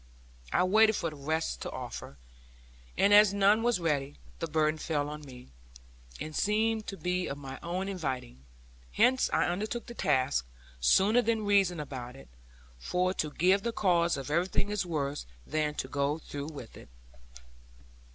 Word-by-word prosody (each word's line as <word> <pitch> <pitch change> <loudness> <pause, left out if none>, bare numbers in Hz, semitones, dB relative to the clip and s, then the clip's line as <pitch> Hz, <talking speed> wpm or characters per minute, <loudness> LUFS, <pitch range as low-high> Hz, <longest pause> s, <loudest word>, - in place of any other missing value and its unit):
I - - +3
waited 215 +3 +5
for 165 -4 -2
the - - -10
rest 155 +3 -2
to - - -4
offer; 70 - -7 0.8
and 200 +1 +4
as 205 -1 +7
none 200 +2 +4
was 235 -4 +2
ready, 145 -4 -1 0.2
the 165 - -2
burden 155 0 +1
fell 145 -3 -1
on 150 0 -7
me, 125 -4 -12 0.7
and 155 0 -6
seemed 220 +1 +1
to 195 - -5
be 180 0 -1
of 140 - -4
my 135 -2 -8
own 180 +3 -3
inviting. 130 - -4 0.5
Hence 260 +1 +3
I - - +2
undertook 215 +7 -2
the 240 - -9
task, 130 - +1 0.3
sooner 195 - +4
than 225 -2 0
reason 195 -4 +3
about 130 -4 -6
it; 135 - -14 0.5
for 180 - 0
to 155 - -2
give 185 +6 +3
the 235 - -2
cause 170 -7 +2
of 135 +1 -6
everything 180 +5 0
is 205 -3 -1
worse 145 - -3 0.2
than 150 -1 -1
to 130 - -3
go 140 +2 0
through 145 -2 -7
with 140 -7 -9
it. - - -14
170 Hz, 165 wpm, -30 LUFS, 145-200 Hz, 0.8 s, as